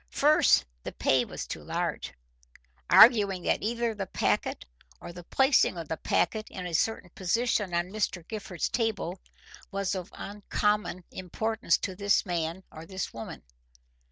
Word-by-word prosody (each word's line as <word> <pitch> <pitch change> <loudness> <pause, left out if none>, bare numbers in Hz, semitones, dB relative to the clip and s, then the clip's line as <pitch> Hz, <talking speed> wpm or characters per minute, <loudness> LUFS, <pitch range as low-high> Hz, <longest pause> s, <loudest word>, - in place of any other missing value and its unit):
First, - - +4 0.2
the - - -6
pay - - +2
was - - -6
too - - -6
large, - - -3 0.8
arguing 205 -6 +7
that - - +1
either 235 +1 -1
the 200 -3 -5
packet - - -1 0.3
or 175 - -9
the 175 0 -10
placing 265 - +3
of 165 -3 -6
the 160 - -2
packet 215 +5 0
in 185 -2 -7
a 175 - -5
certain 180 +1 0
position 205 +1 0
on 175 +2 -1
Mr. 190 -5 -2
Gifford's 200 -6 -3
table 215 -6 -2 0.5
was 195 -1 -2
of 185 -2 -5
uncommon 210 -2 -2
importance 185 +1 -1
to 190 - -4
this 200 +2 +2
man 170 0 -2
or 160 +1 -10
this 190 0 -5
woman. 115 -1 -8
195 Hz, 150 wpm, -28 LUFS, 175-215 Hz, 0.8 s, arguing